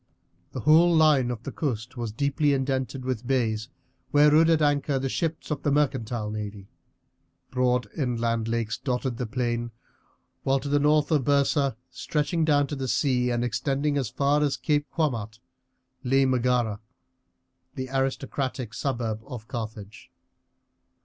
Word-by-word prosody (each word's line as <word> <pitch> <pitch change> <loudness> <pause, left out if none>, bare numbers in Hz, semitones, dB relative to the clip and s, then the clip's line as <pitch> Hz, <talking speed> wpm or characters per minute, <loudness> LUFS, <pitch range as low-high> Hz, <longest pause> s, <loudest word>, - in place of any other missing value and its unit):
The - - -5
whole 165 +3 +5
line 150 -6 +4
of 120 -2 -5
the - - -5
coast 125 -4 -3
was 120 -3 -4
deeply 140 +4 +1
indented 130 -1 -2
with 125 -2 -3
bays, 115 -5 0 0.4
where 145 +1 +5
rode 160 +2 +5
at 165 -2 +4
anchor 145 -2 +1
the 135 0 -2
ships 160 +2 -3
of 145 -1 -2
the 145 - 0
mercantile 120 -7 0
navy. 105 -2 -6 0.8
Broad 125 -1 +1
inland 115 -4 -1
lakes 115 -1 -2
dotted 125 -2 -2
the 125 - -3
plain; 120 -1 -2 0.7
while 135 0 +2
to 140 - -6
the 145 0 +3
north 150 +1 +3
of 150 -4 +3
Byrsa, 140 -1 +2 0.2
stretching 160 +4 -1
down 145 -2 +3
to 145 - -5
the 135 -1 -3
sea 125 -2 +1
and 120 0 0
extending 140 +4 -1
as 135 -6 -1
far 145 +4 +1
as 145 -2 +1
Cape 145 -2 0
Quamart, 115 -9 -2 0.7
lay 135 +1 +3
Megara, 125 -4 +1 1.0
the 130 0 -4
aristocratic 135 -2 -2
suburb 120 -5 -2
of 120 -5 -8
Carthage. 110 -2 -7
130 Hz, 150 wpm, -26 LUFS, 120-145 Hz, 1.0 s, whole